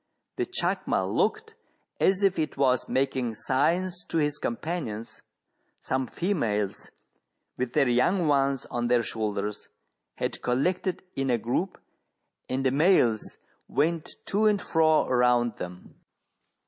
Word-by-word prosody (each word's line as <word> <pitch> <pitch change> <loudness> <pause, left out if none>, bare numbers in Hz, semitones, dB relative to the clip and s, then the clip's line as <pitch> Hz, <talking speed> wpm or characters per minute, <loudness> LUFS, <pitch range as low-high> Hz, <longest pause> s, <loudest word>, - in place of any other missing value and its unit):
The - - -1
chacma - - 0
looked 445 0 0 0.5
as 195 +1 +3
if 195 -3 +3
it 155 - -2
was 130 -3 +2
making 130 -3 0
signs 175 - 0
to 165 - -2
its 150 -1 0
com 115 - -2
panions: 130 -10 -5 0.6
some 130 0 -1
females, 115 - -1 0.7
with 125 -1 -3
their 145 -3 +3
young 155 +9 +2
ones 140 -2 +2
on 120 0 -1
their 120 -1 +3
shoul 110 -3 -2
ders, 105 +1 -4 0.5
had - - -3
collected 180 +9 0
in 135 -1 -1
a 120 - +3
group, 120 - -2 0.7
and 135 +1 -1
the 130 - +4
males 140 - +3 0.3
went 165 +1 -1
to 215 +2 +2
and 210 -1 +3
fro 160 -3 +3
around 120 -2 +2
them. 90 0 -8
135 Hz, 135 wpm, -27 LUFS, 120-170 Hz, 0.7 s, the